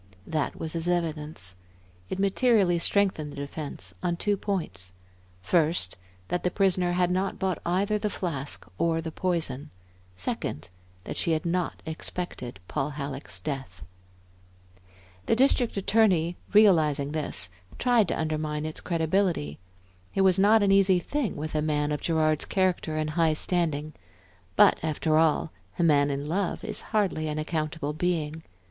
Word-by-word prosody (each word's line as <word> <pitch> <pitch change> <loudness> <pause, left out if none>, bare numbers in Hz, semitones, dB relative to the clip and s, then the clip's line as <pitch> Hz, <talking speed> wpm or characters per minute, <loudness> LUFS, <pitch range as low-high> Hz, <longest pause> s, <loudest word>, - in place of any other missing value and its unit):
That 155 -3 -1
was 160 -1 -3
his 165 0 -2
evidence. 155 - -2 0.5
It - - -3
materially 195 -2 +3
strengthened 175 -5 +1
the - - -10
defence 140 - -5
on 175 - 0
two 205 +3 +1
points; 125 - -3 0.5
first, 155 - +2 0.3
that 180 - 0
the 180 - +1
prisoner 185 -2 +2
had 180 0 +2
not 190 +1 0
bought 190 -2 -1
either 200 +4 +1
the 210 0 -1
flask 150 -8 -4
or 165 0 +2
the 160 0 -4
poison; 155 -6 -2 0.5
second, 90 -2 -3 0.3
that - - -6
she 165 - +2
had 155 +1 -1
not 175 0 -1
expected 160 - -5
Paul 135 - -1
Halleck's 135 -9 -5
death. 130 -5 -5 1.4
The - - +4
District 245 -3 +3
Attorney, 190 -5 +3 0.2
realizing 155 -9 +4
this, 150 -11 -1 0.3
tried 240 -5 +3
to - - -1
undermine 155 -1 -2
its 155 - -4
credibility. 165 - 0 0.6
It 195 - +3
was 190 -1 +4
not 210 +2 +5
an 200 - +3
easy 195 -1 +5
thing 260 - -2
with 155 +1 -5
a 155 - +1
man 150 -1 0
of 150 - -2
Gerard's 155 -2 +1
character 180 -4 0
and 155 0 -1
high 160 0 +3
standing; 155 -2 0 0.6
but - - +5
after 155 0 +1
all, 160 0 +2 0.3
a 175 - +1
man 145 -3 +4
in 140 0 -2
love 180 +4 -1
is 215 - -2
hardly 195 -8 +1
an 150 0 -3
accountable 155 -1 -2
being. 160 -2 -1
160 Hz, 150 wpm, -27 LUFS, 150-185 Hz, 1.4 s, not